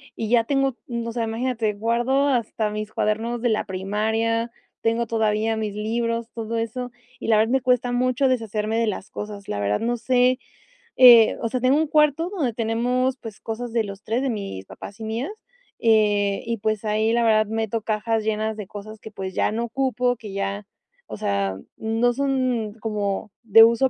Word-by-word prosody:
y 220 - -3
ya 235 -1 +4
tengo, 270 0 0
m 235 -1 -3
o - - -3
sea, 230 0 -2
imagínate, 225 -1 -1
guardo 240 +6 +1
hasta 230 -4 0
mis 215 0 -5
cuadernos 225 +3 -1
de 240 - +2
la 215 - 0
primaria, 220 +4 -1 0.3
tengo 230 +1 +1
todavía 220 0 +1
mis 215 -2 -2
libros, 230 +2 -2
todo 230 0 -3
eso. 245 +2 -4 0.3
Y, - - -6
la 220 - +5
verdad, 220 +2 +2
me 265 0 +2
cuesta 250 -1 +2
mucho 255 +2 +2
deshacerme 225 -3 -1
de 230 - +2
las 200 -2 -4
cosas, 205 -1 -7
la 100 - -3
verdad, 100 0 0
no 240 +1 -1
sé. 250 +2 +3 0.6
Eh, 240 -3 +8
o - - 0
sea, 250 +2 -2
tengo 255 +3 +4
un 315 +1 +1
cuarto 300 +3 +3
donde 310 - -1
tenemos, 245 +3 0
pues, 225 -5 -9
cosas 230 +2 -5
de 225 -1 +1
los 195 0 -9
3, 230 +3 -1
de 270 - 0
mis 195 - -5
papás 200 - -10
y 220 - -5
mías, 230 - -3 0.5
eh, 205 -3 +3
y, 230 0 -2
pues, 215 0 -1
ahí, 215 +1 +1
la 235 0 +2
verdad, 215 -1 +4
meto 225 0 -2
cajas 220 +1 -1
llenas 220 0 -1
de 210 -3 -6
cosas 210 +2 -9
que, 220 - -10
pues, 190 -3 -6
ya - - +1
no 225 +2 -2
ocupo, 250 0 0
que 215 -3 -9
ya, 195 +1 -3 0.4
o - - -6
sea, 100 -1 -1 0.2
no 225 +2 +1
son 255 -5 0
como 210 -2 -2
de 225 0 +8
uso 235 +3 +4
225 Hz, 195 wpm, -23 LUFS, 215-245 Hz, 0.6 s, Eh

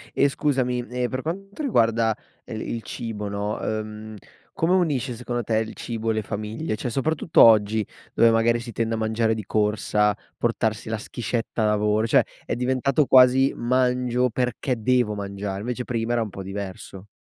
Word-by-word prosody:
E 140 - +4
scusami, 130 -4 0
ehm, 125 0 -1
per 130 0 -3
quanto 195 - -5
riguarda 115 - +2 0.3
el 110 -3 -6
il 115 - -4
cibo, 105 -3 -5
no, 100 +1 -2
uhm, 110 0 -4 0.4
come 165 +3 +1
unisce 145 -9 +1
secondo 120 +1 -3
te 110 0 0
il 110 0 -4
cibo 115 -1 -3
le 110 0 0
famiglie? 110 +6 -4
Cioè 120 - -4
soprattutto 150 +6 +2
oggi, 110 -1 +5 0.3
dove 115 - +5
magari 115 +1 +3
si 115 0 -8
tende 115 0 -1
a - - -3
mangiare 110 0 +1
di 110 -2 -5
corsa, 105 0 +1 0.2
portarsi 110 -2 -1
la 110 - -1
schiscetta 115 +1 -3
a - - +3
lavoro, 105 +1 +2
cioè - - +5 0.2
è - - -2
diventato 130 +4 +1
quasi 130 +1 +6
"mangio 125 0 +1
perché 125 +2 -1
devo 120 -2 +2
mangiare" 100 -1 -4
invece 125 +2 -3
prima 115 -1 -2
era 120 -1 +2
un 110 - -3
po' 95 0 -8
diverso. 95 0 -7
115 Hz, 170 wpm, -24 LUFS, 110-125 Hz, 0.4 s, quasi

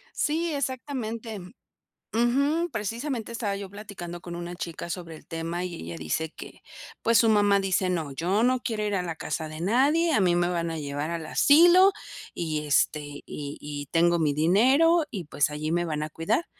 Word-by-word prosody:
Sí, 325 +2 0
exactamente. 245 -5 -4 0.7
Ujú, 280 +9 +2
precisamente 230 +2 -3
estaba 215 -4 -2
yo 200 -1 -6
platicando 190 -4 -8
con 175 -1 -7
una 175 0 -6
chica 170 -1 -6
sobre 170 -2 -6
el - - -16
tema 165 +2 -4
y 180 -1 -5
ella 85 - -7
dice 115 - -2
que, - - -11 0.4
pues, 230 0 +4
su 230 - +4
mamá 205 -2 +4
dice: 190 -1 +1
"No, 160 -6 -2
yo 180 +9 0
no 255 +1 +3
quiero 220 -3 -2
ir 205 - -1
a 185 - 0
la 165 -2 -4
casa 160 -1 -4
de 155 +1 -8
nadie, 285 - +3
a 220 - +3
mí 180 -2 +3
me 175 0 +2
van 170 -2 -1
a 165 - -4
llevar 145 +1 -3
al 165 -2 -4
asilo 350 - +6 0.4
y 155 -3 -3
este, 150 +1 +2 0.3
y 145 -1 -6
y 145 -1 -6
tengo 170 +1 +3
mi 155 -3 +2
dinero 260 - +4
y 190 -5 -5
pues, 145 -1 0
allí 155 +2 -3
me 175 0 +1
van 155 -2 -3
a 155 - -2
cuidar". 180 - -1
185 Hz, 190 wpm, -26 LUFS, 165-235 Hz, 0.7 s, asilo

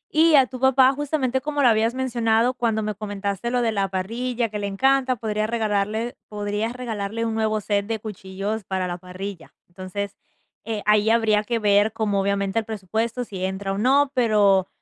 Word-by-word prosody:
Y 320 0 +6
a 270 -2 +7
tu 255 0 -9
papá, 265 0 +5
justamente 270 -3 -1
como 290 0 -2
lo - - +6
habías 225 +2 +2
mencionado, 240 -2 +1
cuando 225 -3 0
me 215 - -2
comentaste 200 +1 -3
lo 250 - +1
de 230 - +1
la 195 -1 0
parrilla, 230 +5 -2
que 210 0 -5
le 200 - -2
encanta, 260 +5 +2
podría 215 -1 -1
regalarle 220 0 -1
podrías 210 +2 -2
regalarle 230 -3 -3
un 225 - -1
nuevo 220 -1 0
set 200 0 -1
de 225 - -1
cuchillos 205 +1 -5
para 190 -1 -2
la 175 0 -4
parrilla. 185 0 -8
Entonces, 190 +3 -6 0.5
eh, 220 -2 -3
ahí 210 +1 +4
habría 220 -2 +3
que 235 +2 -1
ver 205 0 +3
como, 210 -3 0
obviamente, 200 +1 0
el 220 - -5
presupuesto, 220 +3 -2
si 195 -5 -7
entra 190 +1 -2
o - - -4
no, 270 +4 +3
pero 205 -6 +3
215 Hz, 185 wpm, -23 LUFS, 200-240 Hz, 0.5 s, a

